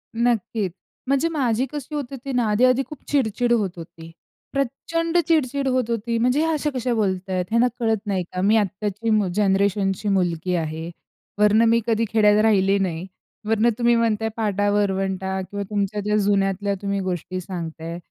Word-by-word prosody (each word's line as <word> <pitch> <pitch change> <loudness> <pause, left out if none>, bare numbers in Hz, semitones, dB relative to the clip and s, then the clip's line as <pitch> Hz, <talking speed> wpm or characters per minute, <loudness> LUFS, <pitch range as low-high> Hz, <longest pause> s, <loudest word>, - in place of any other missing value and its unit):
नक्कीच, 225 -4 0 0.4
म्हणजे 275 +4 +2
माझी 260 -6 0
कशी 295 0 -6
होत 290 - -1
होती 275 0 -6
ना? 245 -1 +2
आधी-आधी 255 +5 +3
खूप 300 - -9
चिडचिड 245 -3 +1
होत 200 -6 0
होती, 165 0 -11 0.4
प्रचंड 330 +5 -1
चिडचिड 280 -4 +1
होत 255 -3 0
होती. 230 0 -1
म्हणजे 250 +4 +2
ह्या 325 0 +1
अशा 300 -1 0
कशा 250 -1 -1
बोलतायत? 185 -4 -1
ह्यांना 230 +2 +3
कळत 225 -2 +1
नाही 190 -3 0
का? 180 - -2
मी 205 +3 +4
आत्ताची 210 +2 -2
मु 215 -3 +3
जनरेशनची 200 0 +1
मुलगी 180 -2 0
आहे, 160 0 -3 0.5
वरनं 210 +2 +5
मी 230 +1 +4
कधी 230 0 +2
खेड्यात 210 -1 +4
राहिले 200 -2 +3
नाही. 180 -3 -2 0.4
वरनं 225 +1 +3
तुम्ही 240 -1 +3
म्हणताय, 225 -1 +1
पाटा-वरवंटा 195 -2 0
किंवा 200 +2 -5
तुमच्या 205 0 -1
ज्या 210 +1 +1
जुन्यातल्या 200 0 +1
तुम्ही 200 0 -1
गोष्टी 185 +1 -3
सांगताय, 165 -2 -6
210 Hz, 160 wpm, -23 LUFS, 190-240 Hz, 0.5 s, वरनं